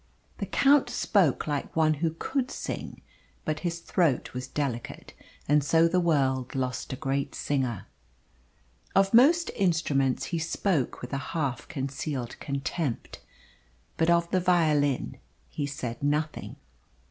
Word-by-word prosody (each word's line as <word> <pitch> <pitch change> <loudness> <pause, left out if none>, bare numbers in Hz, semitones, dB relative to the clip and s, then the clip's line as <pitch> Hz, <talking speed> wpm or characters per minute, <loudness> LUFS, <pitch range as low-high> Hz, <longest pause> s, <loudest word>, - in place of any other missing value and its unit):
The - - -3
Count 280 -2 +4
spoke 195 - +2
like 145 -2 -3
one 155 -1 +4
who 165 -1 0
could 265 +4 -1
sing, - - -6 0.4
but 155 0 -1
his 170 -1 -2
throat 165 -10 +1
was 125 0 -5
delicate, 130 -5 -4 0.3
and 145 0 +4
so 165 +3 +4
the 180 +2 +2
world 135 -7 +1
lost 130 -2 -2
a - - -2
great 135 +2 -2
singer. 130 -7 -1 1.1
Of 195 +1 +4
most 315 +9 +5
instruments 150 - +1
he 170 - +1
spoke 165 - -1
with 125 - -6
a - - +1 0.2
half 140 -5 -2
concealed 135 -3 -4
contempt. 140 -1 -3 0.8
But 165 +1 +2
of 170 0 +3
the 185 - +3
violin 155 -7 +2 0.3
he 145 -2 -2
said 125 -4 -5
nothing. 150 +2 -1
150 Hz, 135 wpm, -28 LUFS, 135-170 Hz, 1.1 s, most